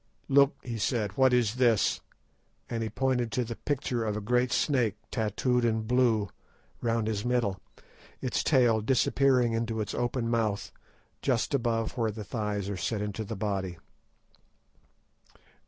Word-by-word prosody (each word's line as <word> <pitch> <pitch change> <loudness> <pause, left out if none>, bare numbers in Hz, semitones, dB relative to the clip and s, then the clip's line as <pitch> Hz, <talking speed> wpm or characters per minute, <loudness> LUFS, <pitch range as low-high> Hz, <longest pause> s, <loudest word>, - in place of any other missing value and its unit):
"Look," 140 +1 +5
he 115 -2 -5
said; 105 -2 -1
"what 130 -1 +4
is 120 -2 +2
this?" 120 -5 +3 0.7
and 115 -1 -3
he 110 - -2
pointed 125 0 0
to 125 - +1
the 115 +1 -5
picture 125 -4 -2
of 105 -1 -1
a - - -1
great 125 +3 +1
snake 120 -9 +1 0.2
tattooed 120 +2 0
in 110 -1 +1
blue 115 -3 +2 0.5
round 115 -1 0
his 105 -2 -2
middle, 120 -6 0 0.6
its 125 - -1
tail 120 -6 +4
disappearing 130 0 +3
into 115 0 -1
its 105 -3 -3
open 120 -1 -1
mouth 110 -3 -1 0.5
just 125 0 0
above 115 -3 0
where 115 -1 +2
the 105 0 -6
thighs 105 -1 -3
are 100 -1 -3
set 100 +5 -2
into 105 +1 -4
the 110 +2 -5
body. 95 -3 -2
115 Hz, 150 wpm, -29 LUFS, 105-125 Hz, 0.7 s, Look